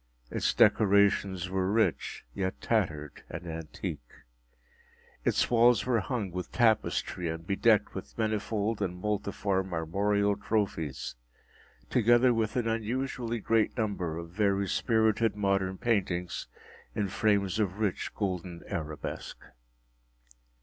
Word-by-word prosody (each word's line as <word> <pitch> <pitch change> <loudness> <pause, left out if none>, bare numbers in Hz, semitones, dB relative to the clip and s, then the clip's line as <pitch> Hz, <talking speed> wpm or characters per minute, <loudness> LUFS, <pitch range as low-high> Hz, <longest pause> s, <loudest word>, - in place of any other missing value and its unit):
Its - - 0
decorations 100 -3 +4
were 95 0 0
rich, 110 +1 0
yet 95 -1 -2
tattered 80 -10 -1
and 85 +2 -7
antique. 80 -6 -6 1.1
Its - - +1
walls 120 -1 +5
were 125 -2 +2
hung 105 -2 -3
with 90 +1 -5
tapestry 110 -6 +1
and 80 0 -5
bedecked 105 +2 +3
with 95 - -8
manifold 110 0 -1
and 90 -2 -2
multiform 100 -1 -1
armorial 100 +5 +1
trophies, 95 -12 -2 0.8
together 120 +1 +5
with 110 -2 -1
an 120 -2 0
unusually 120 +1 -2
great 115 +1 +1
number 95 -8 -1
of 85 0 -7
very 100 0 +1
spirited 110 +1 +2
modern 95 -2 0
paintings 90 -7 -1 0.5
in 100 - 0
frames 100 0 +1
of 100 -2 0
rich 105 -4 -1
golden 90 -4 -3
arabesque. 75 -2 -5
100 Hz, 115 wpm, -29 LUFS, 90-110 Hz, 1.1 s, walls